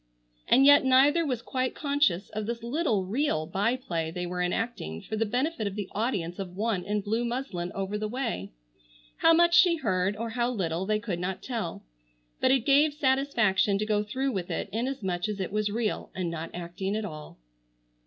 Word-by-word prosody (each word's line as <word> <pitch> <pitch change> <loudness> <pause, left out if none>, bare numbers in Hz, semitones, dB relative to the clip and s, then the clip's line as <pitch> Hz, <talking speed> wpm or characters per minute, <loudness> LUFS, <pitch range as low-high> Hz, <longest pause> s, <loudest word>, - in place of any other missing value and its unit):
And 270 - +6
yet 285 0 +8
neither 275 +5 +5
was 250 -6 -2
quite 255 -1 -2
conscious 280 - +1
of 215 0 -4
this 235 0 -4
little 235 - 0
real 210 - 0
by 200 +8 0
play 170 -11 -3
they 180 +2 -4
were 180 0 -3
enacting 180 - -2
for - - -4
the 225 0 0
benefit 250 +1 -1
of 200 - -5
the 205 -3 -4
audience 200 -6 -2
of 180 -2 -6
one 210 -4 0
in 205 +2 -1
blue 220 +4 -1
muslin 235 -8 -3
over 195 +2 -2
the 215 - -2
way. 230 - -3 0.7
How 330 - +5
much 340 +1 +5
she 355 -1 +6
heard, 190 - 0
or 230 +1 -4
how 240 +1 0
little 185 -5 -2
they 215 0 +2
could 210 -5 -4
not 180 +1 -4
tell, 225 -10 -4 0.6
but - - +3
it 260 -3 +3
gave 290 +1 +4
satisfaction 260 -9 +2
to 210 - -1
go 210 -1 +1
through 260 +6 -2
with 185 -6 -3
it - - -3
inasmuch 215 -6 -2
as 205 -1 -4
it 190 - -3
was 210 0 0
real, 220 +1 -2
and 180 -3 -2
not 165 0 -5
acting 175 +3 -4
at 220 -1 -2
all. 155 -6 -9
215 Hz, 195 wpm, -28 LUFS, 185-255 Hz, 0.7 s, yet